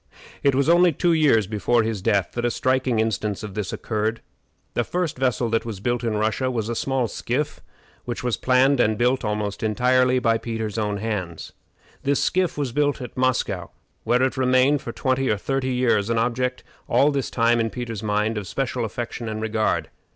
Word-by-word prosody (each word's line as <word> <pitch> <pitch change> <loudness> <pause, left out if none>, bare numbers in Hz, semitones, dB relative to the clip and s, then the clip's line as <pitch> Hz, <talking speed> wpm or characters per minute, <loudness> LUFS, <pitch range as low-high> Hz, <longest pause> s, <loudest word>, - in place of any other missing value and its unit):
It 140 -2 +3
was 140 +2 +2
only 175 +1 +5
two 170 +3 +1
years 140 -10 +4
before 110 +3 +1
his 110 -3 -2
death 100 -1 +1
that 120 - -3
a 120 - +2
striking 130 0 0
instance 110 -2 -1
of 105 -2 -6
this 105 -3 -3
occurred. 110 +1 -2 0.5
The 120 - +1
first 175 +3 -2
vessel 125 -2 0
that 115 - +1
was 110 -4 -6
built 120 +4 -1
in 110 -2 0
Russia 110 +5 0
was 115 -3 -2
a 120 - -2
small 130 0 0
skiff, 125 +7 -3 0.4
which 120 0 -4
was 125 -3 0
planned 130 +6 +3
and 110 -2 +2
built 125 +3 +1
almost 105 -1 -2
entirely 125 +4 +3
by 115 -2 +2
Peter's 110 -2 -3
own 105 -1 -1
hands. 100 -6 -4 0.5
This 140 0 +1
skiff 185 -4 +1
was 140 -4 -1
built 145 +2 +1
at 125 -3 -8
Moscow, 120 -9 0 0.3
where 125 +3 +2
it 130 - 0
remained 130 +2 +3
for 115 - -5
twenty 130 +2 0
or 105 - +2
thirty 135 +4 -2
years, 120 -5 +1
an 115 - +1
object 125 +2 -1 0.3
all 135 +5 +4
this 140 -2 -2
time, 120 0 +2
in 115 0 +1
Peter's 115 -3 -5
mind, 105 +1 0
of 100 - -8
special 130 0 -2
affection 115 +1 -5
and 110 0 -4
regard. 110 0 -1
120 Hz, 195 wpm, -23 LUFS, 110-130 Hz, 0.5 s, only